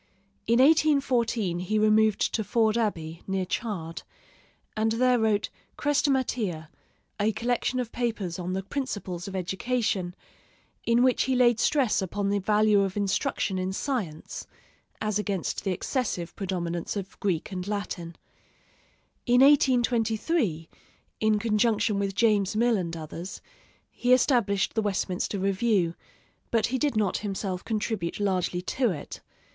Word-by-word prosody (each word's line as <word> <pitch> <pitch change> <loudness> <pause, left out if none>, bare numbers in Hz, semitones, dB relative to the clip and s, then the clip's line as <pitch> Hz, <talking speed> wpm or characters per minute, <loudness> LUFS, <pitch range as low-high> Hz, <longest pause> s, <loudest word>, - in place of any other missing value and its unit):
In 235 +1 +4
1814 260 - +3
he 185 +4 -1
removed 215 0 +3
to 220 - 0
Ford 220 +2 +2
Abbey, 170 -8 -2
near 190 -1 -1
Chard, 180 -6 -4 0.7
and 220 +1 +1
there 250 +1 +3
wrote 220 -2 +1 0.3
'Chrestomathea,' 255 - 0 0.5
a 210 +2 +2
collection 245 +3 -1
of 240 -2 -3
papers 215 -8 -2
on 180 +1 -3
the 190 +1 -2
principles 200 -8 -4
of 195 - -6
education, 190 -1 -1 0.7
in 235 +1 +4
which 255 -1 +3
he 260 0 +1
laid 240 -2 +4
stress 265 -8 +2
upon 200 +2 -2
the 205 - +1
value 210 +1 +3
of 195 0 -2
instruction 195 -1 0
in 185 +1 -2
science, 190 - -4 0.5
as 215 -1 -1
against 200 -4 -2
the 195 - 0
excessive 180 - -2
predominance 175 -3 -3
of 195 -1 -6
Greek 185 -2 -1
and 180 0 -4
Latin. 185 -5 -4 1.1
In 245 +1 +5
1823, 240 - +3 0.5
in 215 -1 +3
conjunction 215 -1 +1
with 195 -1 -2
James 210 -3 +2
Mill 235 +1 +3
and 170 -4 -3
others, 165 +4 -7 0.5
he 245 +1 +2
established 235 -6 +2
the 220 - +1
Westminster 200 -1 -1
Review, 195 -2 +1 0.6
but 230 -2 +2
he 260 +2 -1
did 285 -5 0
not 205 -4 +1
himself 195 -2 -4
contribute 215 -5 -2
largely 185 -3 0
to 245 +5 0
it. 155 -7 -6
210 Hz, 135 wpm, -27 LUFS, 185-235 Hz, 1.1 s, In